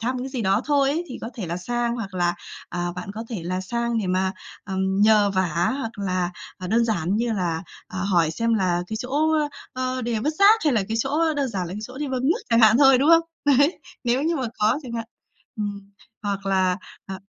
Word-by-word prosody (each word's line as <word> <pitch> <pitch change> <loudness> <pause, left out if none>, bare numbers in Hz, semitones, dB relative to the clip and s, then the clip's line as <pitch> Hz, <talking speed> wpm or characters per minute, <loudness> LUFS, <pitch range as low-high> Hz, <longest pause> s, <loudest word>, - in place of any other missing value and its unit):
thăm 250 +3 -1
cái 255 +2 -4
gì 255 -4 -3
đó 195 +2 +2
thôi 280 -2 +3
ấy 325 +5 -1
thì 250 - -7
có 225 - -6
thể 215 -7 -5
là 170 +1 -3
sang, 240 +5 -1
hoặc 200 -5 -6
là, 175 -1 +1 0.3
à, 175 0 -3
bạn 180 +2 -6
có 225 - -5
thể 205 -8 -4
là 185 +2 -2
sang 235 +4 -1
để 210 - -2
mà, 185 +1 +1 0.3
ừm, 190 0 -1
nhờ 210 -1 +5
vả, 175 -1 +1
hoặc 230 -4 -4
là, 185 -3 -1 0.3
à, 185 - -6
đơn 230 +5 +2
giản 195 -4 0
như 235 +1 0
là, 175 -5 -1 0.3
à, 185 - -6
hỏi 175 -4 +2
xem 230 +8 0
là 180 -4 +1
cái 220 - -4
chỗ, 245 - -5 0.3
ơ, 295 - 0 0.2
ờ, 255 0 -2
đề 235 -1 -1
vứt 300 +7 0
rác, 420 +3 +7
hay 300 - +3
là 220 -4 +2
cái 225 - -1
chỗ, 265 - -2
ơ, 325 -1 +2
đơn 280 -2 0
giản 190 -6 -3
là 170 - -7
cái 210 - -5
chỗ 255 +4 -8
đi 295 -1 -2
bơm 260 -1 -2
nước 375 +10 +2
chẳng 230 0 +5
hạn 220 +1 +6
thôi, 270 -2 +7
đúng 280 +4 +2
không? 335 0 +7 0.4
Đấy, 285 +6 +3 0.3
nếu 245 +3 +1
như 330 +2 +1
mà 260 -4 -1
có 215 +6 +3
chẳng 245 -4 -8
hạn. 230 -1 -3 0.5
Ừm. 200 -2 -5 0.3
Hoặc 200 -1 -3
là, 190 -2 +2 0.3
à 190 0 -6
220 Hz, 245 wpm, -24 LUFS, 190-255 Hz, 0.5 s, rác